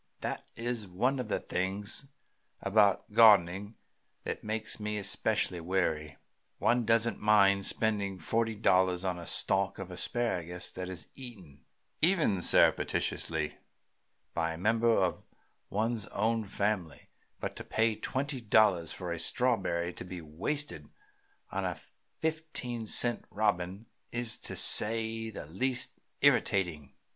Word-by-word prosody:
That - - -4
is 115 -3 -3
one 125 +9 0
of 125 - -3
the - - -1
things 100 +7 -3 0.5
about 100 0 +2
gardening 105 -2 +5 0.5
that - - -4
make 110 +1 -3
me 105 0 -3
especially 100 -2 0
weary. 80 -4 -1 0.4
One 120 -1 +2
doesn't 115 0 +2
mind 100 -2 +4
spending 100 -3 +1
forty 115 +6 0
four 105 - -15
dollars 90 0 +3
on 90 -2 -1
a 85 - -8
stalk 95 0 +2
of 95 -1 -7
asparagus 90 -3 -1
that 90 0 -6
is 90 -2 -6
eaten, 95 - -11 0.4
even 155 - +3
surreptitiously, 80 -2 +1 0.7
by 85 -1 -1
a - - -7
member 115 +5 +2
of 95 -6 +1 0.5
one's 110 +1 -1
own 110 +2 0
family; 100 -4 -2 0.3
but - - -4
to - - -6
pay 110 0 +1
twenty 135 +4 -3
dollars 100 -7 +3
for 90 -2 -5
a 85 - -5
strawberry 90 -5 0
to - - -8
be 90 0 -7
wasted 95 - -4 0.6
on - - -2
a - - -3 0.4
fifteen 155 -8 -3
cent 120 +2 +3
robin 100 -1 -1 0.3
is, 120 -1 +1
to - - -3
say 115 +1 +3
the 105 - -8
least, 120 - -1 0.3
irritating." 85 -8 +2
105 Hz, 130 wpm, -30 LUFS, 90-115 Hz, 0.7 s, gardening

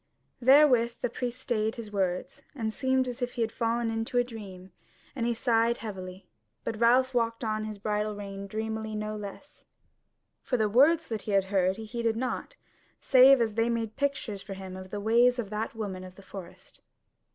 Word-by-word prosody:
Therewith 255 -3 +6
the 245 - -1
priest 245 0 -4
stayed 220 -3 -1
his 225 -4 -8
words, 195 +8 -2
and 220 -4 -2
seemed 260 0 +1
as 250 +1 -6
if 245 0 -2
he 235 - 0
were 225 - -1
fallen 230 0 -1
into 225 +2 -2
a 245 - +5
dream; 195 -6 -10 0.4
and 235 -3 -1
he 240 - +1
sighed 230 0 +2
heavily. 185 -3 -8 0.4
But 215 - -4
Ralph 255 +3 +4
walked 230 -1 0
on 215 -1 -1
by 215 - -4
his 215 -1 -6
bridle 210 +1 -1
rein 200 -1 -7
dreamy 220 +1 -4
no 215 0 -3
less; 210 +8 -10 0.7
for 250 - -1
the 215 -2 +2
words 295 +9 +4
that 220 -2 -3
he 210 - -4
had 195 -1 +4
heard 190 0 +2
he 220 - -7
heeded 230 0 -1
not, 255 - -3 0.4
save 265 0 +7
as 225 -2 +1
they 225 +2 +1
made 230 -2 -2
pictures 270 -8 -2
for 195 -1 -7
him 190 -1 -8
of 185 0 -9
the 205 - -4
ways 235 +4 +4
of 220 -4 -4
that 215 +2 -3
woman 195 -4 -4
of 185 0 -11
the 195 - -14
forest. 185 -2 -11
225 Hz, 195 wpm, -28 LUFS, 205-245 Hz, 0.7 s, save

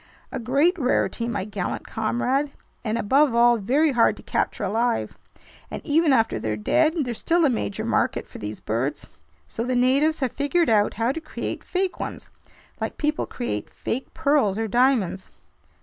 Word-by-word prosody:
"A - - -4
great 285 - +2
rarity, 250 -3 0
my 205 -5 -2
gallant 200 -4 -4
comrade, 255 +6 -1 0.3
and 220 -1 -1
above 260 +4 +3
all 240 0 +5
very 275 +9 +2
hard 240 -3 +3
to - - -13
capture - - -1
alive. 225 +4 0 0.5
And - - -5
even 315 0 +3
after 225 -4 +2
they're 110 -1 -2
dead, 310 - +2
there's 240 -3 -4
still 340 0 +2
a 275 - +3
major 100 - -2
market - - 0
for - - -11
these 105 +1 -6
birds. 130 +7 -2 0.4
So 230 - -4
the 250 +1 -1
natives 275 +6 +3
have 260 -4 -1
figured 305 +4 +1
out 210 -1 +3
how 230 +3 +1
to 325 +4 -5
create - - -5
fake 370 0 -2
ones, - - -6 0.5
like - - -4
people 300 0 -1
create 105 - -4
fake 260 +3 -4
pearls 285 -10 +2
or 225 0 -1
diamonds." 235 -5 +1
245 Hz, 170 wpm, -24 LUFS, 215-295 Hz, 0.5 s, all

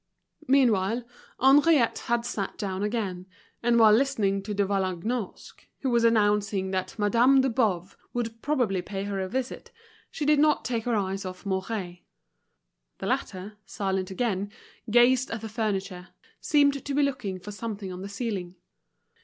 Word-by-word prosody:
Meanwhile, 235 -4 +3 0.4
Henriette 275 -1 +5
had 235 0 +1
sat 205 -5 -4
down 190 -2 -3
again; 205 -4 -2 0.3
and 240 0 +3
while 220 -2 +7
listening 215 -6 +2
to 210 +2 -5
De 200 0 +2
Vallagnosc, 195 +3 -3
who 265 - 0
was 235 -1 +3
announcing 205 -4 +2
that 185 -1 -3
Madame 240 +6 +4
de 265 -1 +1
Boves 200 -7 0 0.2
would 230 -2 -4
probably 245 -11 0
pay 195 +1 -5
her 200 -1 -3
a 190 0 -3
visit, 260 +2 -4 0.4
she 300 - -4
did 300 0 +4
not 300 0 +3
take 230 -3 -2
her 240 -2 +1
eyes 195 -1 -2
off 185 0 -8
Mouret. 190 -2 -3 1.0
The - - -6
latter, 195 +3 -3
silent 190 -1 -2
again, 200 -1 -2 0.4
gazed 245 +3 +4
at 225 -1 -4
the 225 - -5
furniture, 195 -4 -3 0.3
seemed 285 -2 +2
to 285 - -4
be 290 - +3
looking 215 -9 -2
for 205 +3 -8
something 205 -3 -5
on 180 - -7
the 195 - -6
ceiling. 200 -4 -4
210 Hz, 155 wpm, -27 LUFS, 195-245 Hz, 1.0 s, while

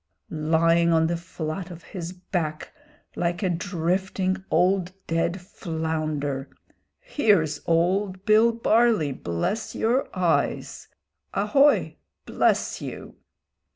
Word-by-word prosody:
Lying 165 +2 +3
on 160 -1 +4
the 170 +1 0
flat 170 0 -5
of 175 -1 -10
his 175 -3 -6
back, 175 -4 -4 0.4
like 175 +2 -1
a 185 - +1
drifting 185 +1 -1
old 185 0 +2
dead 165 +3 -1
flounder; 155 -5 -3 0.5
here's 205 - +1
old 185 +3 +1
Bill 220 +2 +5
Barley, 230 -8 +2
bless 110 - -3
your 245 +5 +1
eyes. 175 -3 0 0.5
Ahoy! 275 +9 +3 0.3
Bless - - +1
you!" - - -8
175 Hz, 100 wpm, -25 LUFS, 160-195 Hz, 0.5 s, Bill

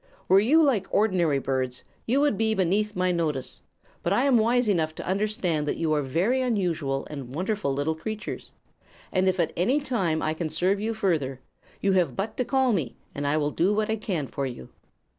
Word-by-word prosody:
Were 190 - +6
you 295 +10 +4
like 235 -10 +2
ordinary 180 -8 +2
birds, 130 -2 -2 0.2
you 255 +5 +3
would 290 -6 +3
be 220 +1 +1
beneath 205 +3 +1
my 185 0 +1
notice; 155 -6 -2 0.4
but 170 - -1
I 205 +6 +3
am 270 -4 +4
wise 240 +2 +2
enough 160 -6 +1
to - - -6
understand 190 -6 0
that - - -1
you 160 -2 0
are 150 - +2
very 180 - +1
unusual 170 - -1
and 135 -3 -7
wonderful 190 -3 -1
little 145 +3 0
creatures, 210 +7 -6 0.6
and 185 0 +2
if 185 0 -1
at 170 - +1
any 245 - +2
time 190 - -1
I 155 - 0
can 160 0 -3
serve 190 +5 +1
you 220 +2 -2
further, 155 - 0 0.4
you 195 - +2
have 175 -9 +2
but 205 +3 -3
to 250 - 0
call 265 -2 +2
me, 150 - -2 0.2
and 145 0 -3
I 145 +2 +2
will 150 -1 0
do 190 +7 +1
what 215 +1 0
I - - +2
can 190 -9 -2
for 135 +1 -3
you." 120 - -8
185 Hz, 205 wpm, -26 LUFS, 155-215 Hz, 0.6 s, Were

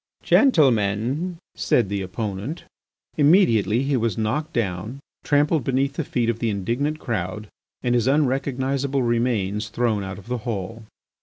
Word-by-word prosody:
"Gentlemen," 135 - +2 0.2
said 120 - +1
the 100 0 -2
opponent.... 105 - -4 0.5
Immediately 135 - +4
he 140 0 0
was 115 -5 0
knocked 130 +9 -1
down, 110 - -3 0.2
trampled 145 0 +2
beneath 135 +2 0
the 160 - -2
feet 120 -4 -1
of 115 -1 -1
the 115 - 0
indignant 120 +10 -1
crowd, 105 - -4 0.3
and 120 -1 +1
his 120 0 +2
unrecognisable 135 -1 0
remains 115 -3 0
thrown 110 -3 0
out 95 0 -6
of 100 - -12
the 125 0 -3
hall. 115 -1 -5
120 Hz, 140 wpm, -23 LUFS, 105-140 Hz, 0.5 s, Immediately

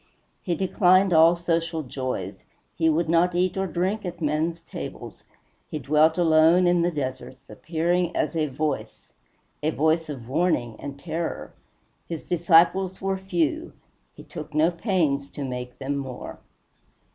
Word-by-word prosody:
He 175 - -1
declined 185 0 +3
all 165 +2 +6
social 165 -1 -1
joys; 125 -7 -5 0.3
he 160 -1 +2
would 160 +1 +1
not 170 +2 +2
eat 180 +1 +1
or 190 0 -1
drink 185 +6 -1
at 175 -2 -6
men's 160 +2 -1
tables; - - -9 0.4
he - - -4
dwelt 155 +3 +3
alone 165 +1 +5
in 175 -1 +3
the 170 - +2
deserts, 130 -3 -6
appearing 175 +2 -1
as - - -1
a 155 -2 +1
Voice 150 +2 -4 0.5
a 150 - +1
voice 160 +1 +1
of 125 -6 -7
warning 130 -6 0
and 140 0 -7
terror! 165 +1 -4 0.6
His 165 -3 -5
disciples 175 +2 +3
were 195 0 -1
few; 175 -6 -1 0.4
he - - -12
took 150 0 -9
no 160 +3 +4
pains 165 -7 0
to 145 - -6
make 125 -1 -6
them 140 +1 -3
more. 130 -3 -7
165 Hz, 145 wpm, -25 LUFS, 145-175 Hz, 0.6 s, all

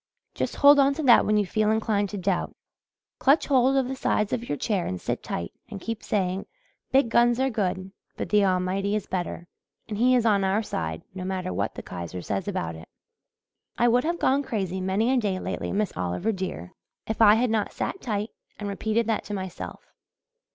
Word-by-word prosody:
Just - - -3
hold 285 0 +7
on 275 0 +4
to 315 - -3
that 245 -4 +6
when 210 0 +3
you 205 - +2
feel 215 +3 +1
inclined 215 -2 +1
to 205 - -5
doubt. 185 -1 -1 0.6
Clutch 280 +4 +4
hold 265 -1 +3
of 265 -2 +2
the 265 - -3
sides 215 -5 0
of 240 0 -3
your 145 - -1
chair 200 - -1
and 90 - -3
sit - - -3
tight 85 - -4 0.2
and 200 - -7
keep 225 +3 -5
saying, 190 -2 -1 0.4
'Big 270 -1 +4
guns 240 +1 +4
are 265 0 +1
good 190 -3 -2 0.3
but - - -4
the 210 -1 +4
Almighty 190 +2 +1
is 210 - -2
better, 175 -1 -4 0.4
and 210 -1 -4
He 255 +2 +5
is 240 -2 +2
on 205 -3 +3
our 195 +3 +1
side, 80 - -4
no 185 -1 -6
matter 185 -1 -3
what - - -2
the - - -7
Kaiser 85 0 -6
says 100 -2 -3
about 80 0 -2
it.' 80 - -12 0.9
I 240 - +4
would 245 +1 +3
have 340 +2 -1
gone 275 -3 +2
crazy 190 -8 -3
many 195 +6 +1
a - - +3
day 205 -6 0
lately, - - -4
Miss 205 -1 0
Oliver, 90 - -1
dear, 185 - -5 0.3
if 220 +1 -3
I 210 -1 +8
had 235 +1 +1
not 215 -2 0
sat 385 - -4
tight 210 -2 -2 0.3
and 205 - -5
repeated 220 +3 0
that 225 -1 0
to 210 - -4
myself. 190 -2 -7
210 Hz, 205 wpm, -26 LUFS, 185-235 Hz, 0.9 s, I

